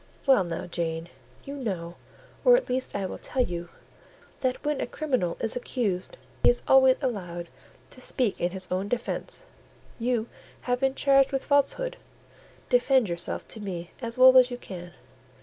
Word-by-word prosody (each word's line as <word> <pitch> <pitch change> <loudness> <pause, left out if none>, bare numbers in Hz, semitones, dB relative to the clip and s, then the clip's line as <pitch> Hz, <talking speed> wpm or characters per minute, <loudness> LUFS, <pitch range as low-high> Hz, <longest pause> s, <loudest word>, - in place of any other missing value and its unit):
"Well 265 -8 +5
now, 170 -1 -4
Jane, 165 -1 -3 0.3
you 280 - -7
know, 185 -10 -4 0.5
or - - +8
at - - 0
least 255 +1 -1
I 200 -1 -1
will - - -6
tell 255 - 0
you, 175 -5 -5 0.7
that 255 +2 -2
when 295 -2 0
a - - -2
criminal 255 - -1
is 225 - 0
accused, 240 - -2 0.2
he - - +6
is 245 - +2
always 265 -1 +6
allowed 175 -8 -3 0.4
to 255 - -10
speak 245 -4 -1
in 175 - +2
his 185 0 -6
own 185 +2 -1
defence. 245 - -3 0.5
You 235 -1 0 0.3
have 245 0 -1
been 270 0 +1
charged 275 -1 +4
with 270 -1 -2
falsehood; 285 - +1 0.7
defend 265 - +3
yourself 170 0 -3
to 220 - -5
me 180 -4 -5
as 230 0 -4
well 260 0 +8
as 250 0 +4
you 245 - -5
can. 180 -6 -9
245 Hz, 165 wpm, -27 LUFS, 180-265 Hz, 0.7 s, or